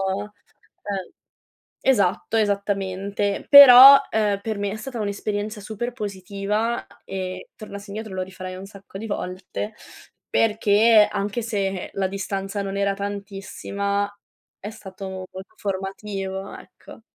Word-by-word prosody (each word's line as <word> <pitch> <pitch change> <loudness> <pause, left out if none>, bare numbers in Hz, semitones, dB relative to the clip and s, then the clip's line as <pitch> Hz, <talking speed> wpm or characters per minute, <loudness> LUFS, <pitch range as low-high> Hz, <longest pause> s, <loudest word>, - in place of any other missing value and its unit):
Ehm 205 -1 -8 0.7
esatto, 205 -4 +2
esattamente. 200 -1 -1
Però, 275 -1 +11
ehm, 210 -2 0
per 220 0 -3
me 200 0 -2
è 210 - -5
stata 235 +2 -6
un'esperienza 205 +1 -3
super 220 +4 -5
positiva 205 +1 -3 0.2
e 185 -1 -6
tornassi 200 -1 -9
indietro 215 -1 -6
lo 185 - -2
rifarei 185 0 -7
un 190 - -9
sacco 195 -1 -12
di 225 - -6
volte, 190 +2 -5 0.6
perché 215 0 +4
anche 205 +3 -2
se 195 -4 -3
la 195 -1 0
distanza 195 +1 -4
non 195 0 -4
era 200 0 +1
tantissima 200 0 -3 0.5
è 205 - -6
stato 195 -3 -9 0.2
molto 190 +3 -10
formativo, 195 0 -5
ecco. - - -15
200 Hz, 120 wpm, -23 LUFS, 195-215 Hz, 0.7 s, Però